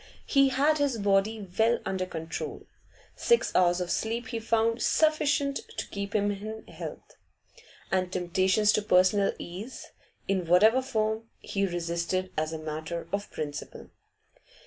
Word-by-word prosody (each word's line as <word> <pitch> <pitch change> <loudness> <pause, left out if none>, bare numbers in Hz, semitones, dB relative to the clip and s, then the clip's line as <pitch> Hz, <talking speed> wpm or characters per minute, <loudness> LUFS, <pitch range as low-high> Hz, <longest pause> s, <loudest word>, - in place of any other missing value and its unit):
He 275 -1 +4
had 290 +3 +2
his 280 -4 +1
body 200 +1 +1
well 230 +2 +4
under 190 -1 -2
control; 160 -2 -5 0.5
six 470 -1 +2
hours 175 -1 +4
of 180 -1 -2
sleep 235 +5 -2
he 230 - -3
found 230 +1 +1
sufficient 300 -2 +2 0.2
to - - -3
keep 200 +1 -5
him 205 -1 +2
in 215 +2 -6
health, - - -9 0.7
and 185 -1 +1
temptations 190 +3 +2
to 215 - +2
personal 195 0 +4
ease, 200 +9 -8 0.4
in 185 -3 0
whatever 215 +9 +5
form, 220 -3 -1
he 195 0 -1
resisted 175 +1 -2
as 155 0 -1
a 160 - -4
matter 155 +2 -5
of 200 0 -2
principle. 150 -2 -6
200 Hz, 140 wpm, -28 LUFS, 180-230 Hz, 0.7 s, whatever